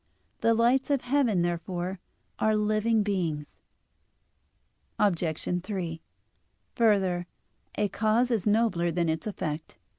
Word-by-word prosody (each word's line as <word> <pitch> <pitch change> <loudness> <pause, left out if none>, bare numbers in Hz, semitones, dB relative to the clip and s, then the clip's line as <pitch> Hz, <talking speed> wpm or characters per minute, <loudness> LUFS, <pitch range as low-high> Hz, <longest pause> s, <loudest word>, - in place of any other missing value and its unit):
The 230 0 +3
lights 245 +4 +3
of 280 -3 +2
heaven, 245 -9 +2
therefore, 175 +2 -3 0.4
are 215 0 +3
living 215 +1 +2
beings. 170 -7 -1 1.5
Obj. 180 -2 0
3: 175 -5 -4 0.7
Further, 190 -6 +2 0.5
a 210 - +1
cause 220 +5 +1
is 220 -4 0
nobler 210 -5 +2
than 170 0 0
its 160 +5 -2
effect. 160 -6 -4
200 Hz, 110 wpm, -28 LUFS, 175-220 Hz, 1.5 s, The